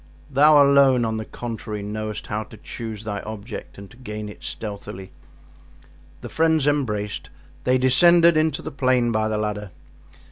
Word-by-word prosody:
"Thou 145 Hz, +2 st, +6 dB
alone, 135 Hz, -3 st, +5 dB
on 110 Hz, 0 st, -2 dB
the 110 Hz, -, -4 dB
contrary, 110 Hz, -3 st, -6 dB
knowest 105 Hz, +1 st, -5 dB
how 105 Hz, 0 st, -3 dB
to 110 Hz, -, -14 dB
choose 110 Hz, -2 st, -7 dB
thy 105 Hz, -2 st, -4 dB
object 110 Hz, +1 st, -8 dB
and 100 Hz, 0 st, -10 dB
to -, -, -16 dB
gain 105 Hz, -4 st, -6 dB
it 105 Hz, -, -13 dB
stealthily." 100 Hz, -3 st, -7 dB, 1.1 s
The -, -, -7 dB
friends 160 Hz, -2 st, +2 dB
embraced. 105 Hz, -9 st, -1 dB, 0.4 s
They 130 Hz, +1 st, +3 dB
descended 170 Hz, +7 st, +5 dB
into 155 Hz, -2 st, +1 dB
the -, -, -5 dB
plain 130 Hz, -3 st, +1 dB
by 110 Hz, -1 st, +1 dB
the 110 Hz, -1 st, -1 dB
ladder. 105 Hz, -1 st, -3 dB
115 Hz, 155 wpm, -23 LUFS, 105-140 Hz, 1.1 s, Thou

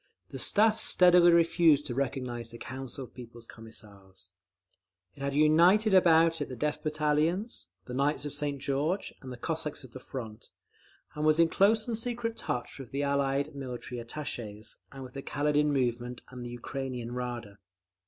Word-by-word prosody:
The -, -, -7 dB
Staff 220 Hz, +1 st, +3 dB
steadily 180 Hz, -1 st, +6 dB
refused 165 Hz, -3 st, +4 dB
to 130 Hz, -, -4 dB
recognise 125 Hz, -3 st, -3 dB
the 115 Hz, -, -9 dB
Council 130 Hz, +1 st, -6 dB
of 125 Hz, -, -13 dB
People's 120 Hz, -2 st, -11 dB
Commissars. 100 Hz, -5 st, -12 dB, 0.8 s
It 140 Hz, -, -14 dB
had 140 Hz, 0 st, -2 dB
united 175 Hz, +8 st, +5 dB
about 165 Hz, -3 st, +5 dB
it 145 Hz, -, -3 dB
the 130 Hz, -, -6 dB
Death 150 Hz, +5 st, -2 dB
Battalions, 155 Hz, +8 st, -1 dB, 0.2 s
the 125 Hz, -, -8 dB
Knights 140 Hz, +3 st, 0 dB
of 145 Hz, -, -4 dB
St. 145 Hz, -1 st, -2 dB
George, 145 Hz, +8 st, -1 dB
and 130 Hz, -, -8 dB
the 125 Hz, -, -7 dB
Cossacks 155 Hz, +2 st, -3 dB
of 130 Hz, -, -12 dB
the 130 Hz, -, -9 dB
Front, 115 Hz, -5 st, -8 dB, 0.6 s
and 150 Hz, -, -4 dB
was 155 Hz, +1 st, +4 dB
in 165 Hz, -1 st, +5 dB
close 215 Hz, +5 st, +3 dB
and 235 Hz, -, -1 dB
secret 230 Hz, 0 st, -3 dB
touch 130 Hz, -, -4 dB
with 130 Hz, -4 st, -8 dB
the 140 Hz, +1 st, -2 dB
Allied 140 Hz, +1 st, 0 dB
military 125 Hz, -2 st, -6 dB
attachès, 115 Hz, -5 st, -6 dB
and 135 Hz, -1 st, -9 dB
with 125 Hz, -1 st, -11 dB
the 135 Hz, -, -6 dB
Kaledin 150 Hz, +1 st, +1 dB
movement 125 Hz, -2 st, -1 dB
and 125 Hz, -1 st, -8 dB
the 120 Hz, -, -6 dB
Ukrainean 125 Hz, -2 st, -5 dB
Rada…. 120 Hz, -5 st, -5 dB
140 Hz, 170 wpm, -29 LUFS, 125-160 Hz, 0.8 s, steadily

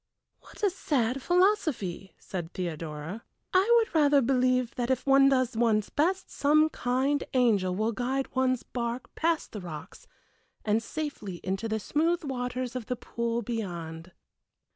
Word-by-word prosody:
"What -, -, -15 dB
a 405 Hz, -, +4 dB
sad 265 Hz, -7 st, 0 dB
philosophy!" 310 Hz, -, +1 dB
said 175 Hz, -3 st, -6 dB
Theodora. 165 Hz, +2 st, -5 dB, 0.3 s
"I 380 Hz, +5 st, +4 dB
would 455 Hz, -1 st, +1 dB
rather 290 Hz, -3 st, +5 dB
believe 255 Hz, -1 st, +2 dB
that 240 Hz, 0 st, -2 dB
if 260 Hz, -1 st, 0 dB
one 275 Hz, 0 st, +6 dB
does 255 Hz, -2 st, +1 dB
one's 220 Hz, -3 st, +2 dB
best 370 Hz, +6 st, 0 dB
some 305 Hz, +2 st, +3 dB
kind 265 Hz, +3 st, 0 dB
angel 205 Hz, -8 st, +3 dB
will 215 Hz, +3 st, 0 dB
guide 260 Hz, +3 st, -2 dB
one's 255 Hz, -1 st, +1 dB
bark 240 Hz, 0 st, -4 dB
past 330 Hz, -1 st, 0 dB
the 210 Hz, -, -6 dB
rocks 170 Hz, -, -9 dB, 0.6 s
and 215 Hz, +1 st, +2 dB
safely 255 Hz, -, -5 dB
into 195 Hz, +4 st, -2 dB
the 220 Hz, 0 st, -1 dB
smooth 330 Hz, -, 0 dB
waters 250 Hz, -2 st, -3 dB
of 245 Hz, -4 st, -4 dB
the 250 Hz, -, -1 dB
pool 235 Hz, 0 st, -3 dB
beyond." 175 Hz, -7 st, -5 dB
250 Hz, 145 wpm, -28 LUFS, 210-280 Hz, 0.6 s, one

